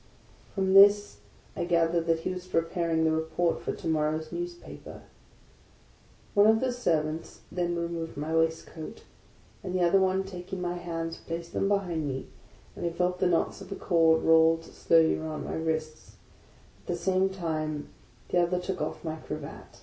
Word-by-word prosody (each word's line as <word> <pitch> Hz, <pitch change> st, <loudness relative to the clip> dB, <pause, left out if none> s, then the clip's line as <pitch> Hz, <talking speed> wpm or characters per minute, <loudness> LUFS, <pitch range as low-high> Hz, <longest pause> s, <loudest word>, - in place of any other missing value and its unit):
From 190 Hz, -1 st, +1 dB
this 200 Hz, -, +6 dB, 0.4 s
I -, -, -2 dB
gathered 170 Hz, -1 st, +2 dB
that 165 Hz, -1 st, +2 dB
he 185 Hz, -, -2 dB
was 180 Hz, 0 st, -7 dB
preparing 165 Hz, -1 st, 0 dB
the 160 Hz, -, +3 dB
Report 160 Hz, +2 st, 0 dB
for -, -, -2 dB
to -, -, -6 dB
morrow's 155 Hz, 0 st, 0 dB
newspaper. 350 Hz, 0 st, -7 dB, 1.3 s
One 205 Hz, +1 st, +6 dB
of 220 Hz, 0 st, +5 dB
the 255 Hz, 0 st, 0 dB
servants 160 Hz, -8 st, -1 dB
then 175 Hz, -1 st, -1 dB
removed 170 Hz, -2 st, -4 dB
my 155 Hz, +2 st, -2 dB
waistcoat, 160 Hz, +4 st, -2 dB, 0.6 s
and 185 Hz, -1 st, -4 dB
the 180 Hz, -, +2 dB
other 175 Hz, +3 st, +5 dB
o 190 Hz, -, +4 dB
le 190 Hz, +1 st, 0 dB
taking 185 Hz, 0 st, -7 dB
my 175 Hz, -1 st, -2 dB
hands, 165 Hz, -2 st, -4 dB
placed 170 Hz, 0 st, -6 dB
them 195 Hz, -, +1 dB
behind 180 Hz, -6 st, 0 dB
me, 135 Hz, -1 st, -4 dB, 0.5 s
and -, -, -7 dB
I 170 Hz, -, +1 dB
felt 180 Hz, +1 st, -1 dB
the -, -, +3 dB
knots 175 Hz, +2 st, 0 dB
of 195 Hz, -, -11 dB
a -, -, -2 dB
cord 165 Hz, -4 st, +3 dB
rolled 165 Hz, 0 st, +5 dB
slowly 165 Hz, -1 st, +3 dB
round 155 Hz, -1 st, -5 dB
my -, -, -4 dB
wrists; 160 Hz, -1 st, -3 dB, 0.7 s
at -, -, -27 dB
the 175 Hz, -, -1 dB
same 190 Hz, +2 st, +1 dB
time 155 Hz, -5 st, -3 dB, 0.4 s
the 180 Hz, -, +2 dB
other 175 Hz, +1 st, +2 dB
took 185 Hz, +1 st, -4 dB
off -, -, -4 dB
my 160 Hz, -1 st, -3 dB
cravat. 155 Hz, -2 st, -8 dB
170 Hz, 175 wpm, -28 LUFS, 160-185 Hz, 1.3 s, this